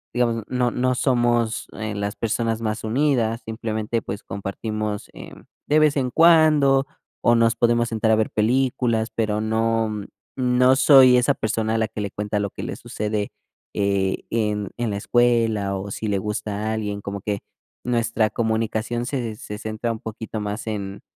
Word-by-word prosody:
digamos, 115 -2 +1
no 125 -1 0
no 130 0 0
somos, 120 -3 +1
eh, 110 -1 -4
las 100 0 -3
personas 115 0 -1
más 110 0 -2
unidas. 115 -2 +1
Simplemente, 110 0 -3
pues 100 +1 -6
compartimos, 105 +2 -4
eh, - - -10 0.3
de 150 - +3
vez 150 -1 +3
en 130 -2 0
cuando, 155 -5 +5 0.4
o 120 - +5
nos 115 0 +3
podemos 120 0 +2
sentar 110 0 0
a - - +6
ver 110 0 0
películas, 120 0 +1
pero 105 -2 0
no 110 0 0 0.5
no 125 0 +4
soy 130 -3 +7
esa 125 +3 +3
persona 110 0 -1
a - - +2
la 110 -1 +1
que - - -7
le 100 - -2
cuenta 105 0 -2
lo 100 -1 -1
que - - -7
le - - -4
sucede, 105 -1 -3 0.4
eh, 100 -1 0
en 105 -3 -1
en 120 -2 -1
la - - -2
escuela, 115 -3 +2
o 100 +1 -6
si 110 - -4
le 100 -2 0
gusta 105 +1 -3
alguien. 105 -2 -3
Como 100 0 -5
que 100 0 -3 0.4
nuestra 115 -2 +1
comunicación 115 +1 -1
se 120 -5 -3
se 105 -2 -7
centra 110 +1 -3
un 110 - -5
poquito 110 0 -6
más 105 +2 -4
en 100 -2 -4
110 Hz, 170 wpm, -23 LUFS, 105-120 Hz, 0.5 s, soy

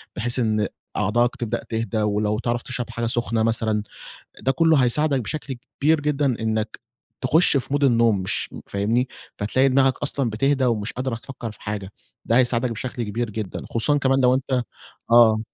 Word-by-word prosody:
بحيث 120 +3 +1
إن 110 -3 +1 0.3
أعضائَك 120 +1 +1
تبدأ 115 -3 -3
تهدى، 115 -1 -1
ولو 105 +1 0
تعرف 120 -1 -1
تشرب 125 -2 -5
حاجة 115 0 -2
سخنة 115 -1 0
مثلًا 110 -2 0 0.6
ده 135 - +2
كله 160 +1 +4
هيساعدَك 135 +2 +2
بشكل 140 +4 -5 0.3
كبير 155 +1 +4
جدًا 145 0 0
إنَّك 110 -1 -2 0.4
تخُش 145 +3 +4
في 130 - -3
مود 145 0 +1
النوم 115 -5 +4
مش 95 - -2 0.2
فاهمني؟ 110 +6 0 0.3
فتلاقي 130 +6 +2
دماغّك 135 0 +3
أصلًا 140 -3 0
بتهدى 135 +5 +1
ومش 110 -3 -1
قادرة 125 -1 -2
تفكَّر 120 -1 -7
في - - -16
حاجة، 105 -2 -5 0.3
ده 115 - +3
هيساعدَك 120 -1 +2
بشكل 120 +1 -4
كبير 115 +2 -3
جدًا 105 -3 -5
خصوصًا 145 +6 +2
كمان 135 -1 +2
لو 125 0 +5
أنت 130 -1 0 0.5
آه. 115 -2 +6
120 Hz, 165 wpm, -23 LUFS, 110-130 Hz, 0.6 s, آه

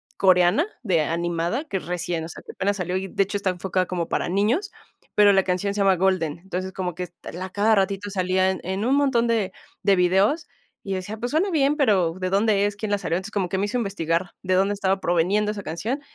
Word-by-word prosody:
coreana 185 - +4 0.2
de 180 -7 +2
animada, 170 - -1
que 195 -10 -2
recién 175 -2 -3
o - - -8
sea, - - -9
que - - -8
apenas 200 +1 -1
salió 180 -1 -2
y, 190 - -3
de 195 - +1
hecho, 205 +1 -3
está 195 -1 -1
enfocada 185 0 -1
como 175 -2 -3
para - - -1
niños, 220 - +1 0.5
pero 205 -1 +7
la 195 - +4
canción 190 +2 -1
se 210 - -4
llama 195 -1 +4
Golden. 175 -4 0
Entonces, 185 +1 -5
como 180 -2 -3
que 180 - -4
est 175 -1 -13
l 175 - -7
a 185 - -4
cada 210 +3 +2
ratito 200 +1 0
salía 185 -1 +1
en 190 - -4
en 190 +3 -2
un 265 +2 +3
montón 265 -5 +2
de 220 -5 +1 0.3
de 200 -1 +4
videos, 195 - +2 0.4
y 195 - -3
decía: 190 +3 -4
"Pues 245 +2 -4
suena 335 +7 +2
bien, 290 -3 +2
pero 195 - +3
¿de 185 0 -1
dónde 200 +1 +2
es? 205 0 -1
¿Quién 215 +1 -4
la 205 - +2
salió?" 170 - -1
Entonces, 190 +4 -6
como 190 -4 -1
que 190 - -1
me 195 - +1
hizo 220 +5 -2
investigar 180 -5 -1
de 185 -1 0
dónde 195 +2 +2
estaba 195 -1 0
proviniendo 190 +5 +1
esa 210 -1 -6
canción, 210 - -3
190 Hz, 240 wpm, -24 LUFS, 180-205 Hz, 0.5 s, pero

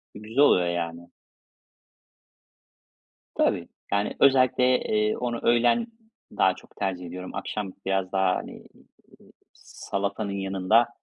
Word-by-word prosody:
güzel 110 +4 -10
oluyor 90 -11 +5
yani. 85 0 -4 2.3
Tabii. - - +1 0.2
Yani, 100 +1 0
özellikle, 130 -2 +4
eee, 105 0 0
onu 120 -1 -3
öğlen 120 - +3 0.5
daha - - +3
çok - - -18
tercih 90 -2 -3
ediyorum. 90 +2 -8
Akşam 95 0 -4
biraz 95 -1 -1
daha, 95 -1 +2
hani, - - -6 0.7
eee, - - -21 0.2
salatanın 100 +1 -4
yanında, 95 +4 +2
100 Hz, 110 wpm, -26 LUFS, 95-115 Hz, 2.3 s, oluyor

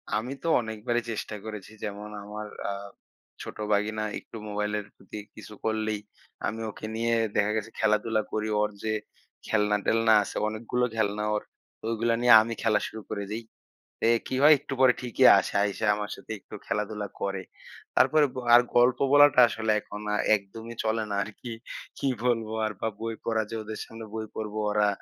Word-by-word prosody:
আমি 115 +4 -2
তো - - -2
অনেকবারই 110 +1 -2
চেষ্টা 110 -1 -4
করেছি। 105 -2 -7
যেমন 105 0 -5
আমার 105 +1 -6 0.2
আ - - -1 0.7
ছোট - - -8 0.2
ভাগিনা 110 +1 0 0.2
একটু - - -11
মোবাইলের 105 0 -2
প্রতি 95 +2 -10 0.2
কিছু 105 - -10
করলেই 110 -1 0 0.5
আমি 110 +1 -4
ওকে 110 - -8
নিয়ে 115 +1 +1 0.2
দেখা 105 +1 +3
গেছে 110 +1 -3
খেলাধুলা 110 +1 +2
করি। 110 0 -1
ওর 105 - +2
যে 110 - 0 0.6
খেলনা-টেলনা 110 +1 +3
আছে - - -8
অনেকগুলো 115 +3 -1
খেলনা 105 -1 0
ওর। 105 - -2 0.4
তো - - -63
ওইগুলো 115 +1 +1
নিয়ে 120 0 +7
আমি 115 +1 -3
খেলা 110 -2 +3
শুরু 110 - -8
করে 100 -1 -3
দেই। 110 +2 -3 0.7
এ - - +5 0.2
কী - - -3
হয়? 150 +2 +9
একটু 140 - -9
পরে 130 -1 +7
ঠিকই 125 -2 +1
আসে, - - -2
আইসা 100 +1 -1
আমার 105 0 -4
সাথে - - -15
একটু - - -14
খেলাধুলা 105 0 -2
করে। 95 -1 -2 0.5
তারপরে 155 -1 +5
গ - - -14 0.2
আর 120 - +10 0.2
গল্প 120 0 +5
বলাটা 145 -2 +7
আসলে 110 -1 -2
এখন 105 0 -9
আ - - +2 0.2
একদমই 110 +4 -9
চলে 110 0 +1
না - - -1
আর 105 - -5
কি। 120 - -7 0.5
কি 140 - -2 0.2
বলবো 115 -3 +1
আর 110 - -2
বা - - 0
বই 115 0 -3
পড়া 115 -1 +1
যে - - -5
ওদের 110 0 -6
সামনে 115 0 -10
বই 110 0 -3
পড়বো 110 -1 -4
ওরা 105 0 +3
110 Hz, 180 wpm, -27 LUFS, 105-115 Hz, 0.7 s, আর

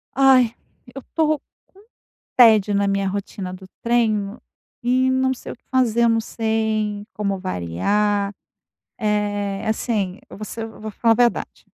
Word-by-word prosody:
Ai, 260 -4 +5 0.4
eu 270 - -7
estou 310 0 0 0.3
com 390 - -21 0.6
tédio 220 -4 +6
na 200 0 +2
minha 195 0 0
rotina 190 -1 -4
do 185 +1 -10 0.2
treino 220 -4 +1 0.4
e 255 +2 +3
não 260 0 +2
sei 255 - -9
o - - -8
que - - -40
fazer. 240 -3 +2
Eu 235 - +5
não 225 0 +2
sei 220 -2 -1
como 200 -2 -1
variar, 200 - 0 0.7
eh, 205 -2 -1
assim, 215 -4 -1
eu - - -11
vou 215 - -6
ser 225 +2 -6
eu 225 - -10
vou 215 0 -5
falar 230 +2 +2
a - - +4
verdade, 240 0 0
215 Hz, 160 wpm, -22 LUFS, 200-240 Hz, 0.7 s, tédio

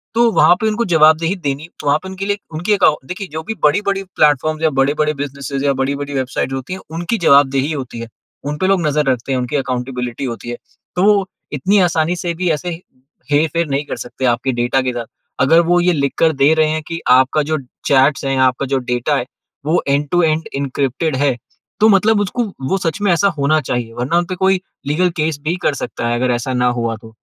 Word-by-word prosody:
तो 235 0 +4
वहाँ 175 - +5
पर 220 - +1
उनको 220 +2 0
जवाबदेही 160 +3 +4
देनी 145 -3 -4 0.2
वहाँ 145 0 +3
पर 190 - -7
उनके 190 +1 -5
लिए 205 0 0 0.2
उनके 185 +7 0 0.3
देखिये 185 +2 -5
जो 160 +1 -4
भी 225 +7 -4
बड़े-बड़े 195 +5 +2
प्लेटफ़ॉर्म्स 155 +2 +2
या 160 - +4
बड़े-बड़े 150 +3 +2
बिज़नेस 140 -1 -6
या 140 -1 +2
बड़ी-बड़ी 140 +1 -2
वेबसाइट 130 0 -2
होती 135 +6 -5
हैं, 190 - -6
उनकी 170 +8 -2
जवाबदेही 140 -1 +4
होती 130 -6 -5
है। 115 - -6 0.4
उन 145 +1 -3
पर 185 - 0
लोग 190 -3 +2
नज़र 150 0 +1
रखते 125 +1 -3
हैं, 130 - +1
उनकी 125 +3 -3
अकाउंटेबिलिटी 125 -1 -3
होती 120 -1 -6
है। 120 - -4 0.4
तो 180 - +1
वो 200 -2 +4 0.3
इतनी 190 +9 +2
आसानी 160 +2 0
से 175 -1 -3
भी 180 +1 -1
ऐसे 160 +3 -2 0.6
हेर-फेर 160 +3 +1
नहीं 140 +1 -1
कर - - -4
सकते 130 +2 -5
आपके 130 +2 -2
डेटा 125 +2 +1
के 130 -1 -2
साथ। 120 -1 -4 0.4
अगर 160 +6 +5
वो 175 +1 +4
ये 180 0 +3
लिख 140 -3 0
कर 165 - +4
दे 140 +2 +4
रहे 155 -1 +3
हैं 155 0 -1
कि 165 0 -4
आपका 130 +4 +4
जो 155 +2 -1 0.3
चैट्स 140 +1 +3
है, 135 0 0
आपका 130 +1 +2
जो 135 0 0
डाटा 125 +3 -1
है, 125 - -2 0.4
वो 160 +4 +2
एंड-टू-एंड 155 +3 +1
एन्क्रिप्टेड 140 +2 -1
है, 140 -2 +2 0.4
तो 215 - +5
मतलब 210 +1 +4
उसको 205 +5 -1 0.3
वो 195 - +2
सच 175 +1 -3
में 205 -2 +2
ऐसा 175 +4 +3
होना 145 +3 +2
चाहिए। 120 -3 -3
वरना 125 +8 -1
उन 175 - +1
पर 185 - -4
कोई 190 0 +2 0.3
लीगल 180 +5 +2
केस 155 -2 -1
भी 160 +3 0
कर - - +2
सकता 120 -2 -4
है, 120 - 0
अगर 125 0 +1
ऐसा 120 +2 -3
ना 125 0 +2
हुआ 115 -1 -1
तो, 110 +1 -14
150 Hz, 215 wpm, -17 LUFS, 135-175 Hz, 0.6 s, वहाँ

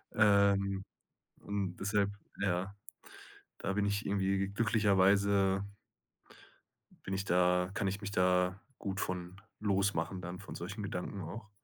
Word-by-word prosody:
Ähm, 100 -2 +4 0.6
und 100 -3 -3
deshalb, 100 0 +1 0.3
ja 95 0 -1 0.8
da 95 - -2
bin 100 0 +1
ich 100 +1 -1
irgendwie 100 0 +1
glücklicherweise 100 -2 +3 1.4
bin 95 - -4
ich 95 +1 -1
da 90 0 +3
kann 100 - -1
ich 100 +2 -2
mich 100 -1 -4
da 90 0 +2 0.2
gut 100 -1 -4
von 90 +1 -4 0.2
losmachen 100 -2 0
dann 90 +1 -6
von 100 - -9
solchen 100 +5 -5
Gedanken 95 0 -4
auch. 105 +6 -7
100 Hz, 125 wpm, -33 LUFS, 95-100 Hz, 1.4 s, Ähm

